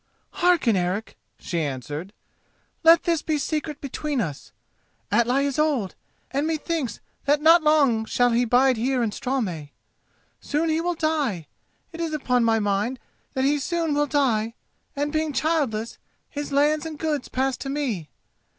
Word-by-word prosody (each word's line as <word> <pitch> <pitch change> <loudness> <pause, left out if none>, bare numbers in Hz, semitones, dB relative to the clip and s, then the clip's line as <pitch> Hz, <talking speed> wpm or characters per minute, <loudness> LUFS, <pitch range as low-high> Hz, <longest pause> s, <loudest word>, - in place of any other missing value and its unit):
"Hearken, 345 - +3
Eric," 185 +4 -2 0.2
she 170 -2 -3
answered. 145 +5 -4 0.7
"Let 330 +1 +7
this 335 -3 +1
be 310 -1 0
secret 300 0 -3
between 285 0 -3
us. 150 -10 -4 0.6
Atli 245 +6 +3
is 280 +1 -2
old, 280 -11 +1 0.4
and 280 +3 0
methinks 315 -6 -2 0.3
that 290 +1 +3
not 325 +3 +6
for - - -12
long 275 -8 +4
shall 245 +2 +2
he 235 +1 +3
bide 250 +2 +3
here 250 +2 +1
in 220 - 0
Straumey. 195 - -3 0.7
Soon 310 +3 -1
he 315 +1 +1
will 350 +1 -1
die; 295 - -1 0.5
it 335 0 -7
is 325 -2 -2
upon 250 -4 +1
my 225 -1 +3
mind 205 +4 0 0.4
that 260 - +1
he 290 +1 +2
soon 330 0 -1
will 295 0 +1
die, 230 -6 +1 0.4
and, 290 +1 -2
being 310 -1 0
childless, 275 -9 -1 0.3
his 290 -1 -5
lands 295 +2 +2
and 310 -2 -7
goods 300 -3 -2
pass 265 0 0
to 270 - -6
me. 250 - -2
275 Hz, 160 wpm, -24 LUFS, 225-305 Hz, 0.7 s, Let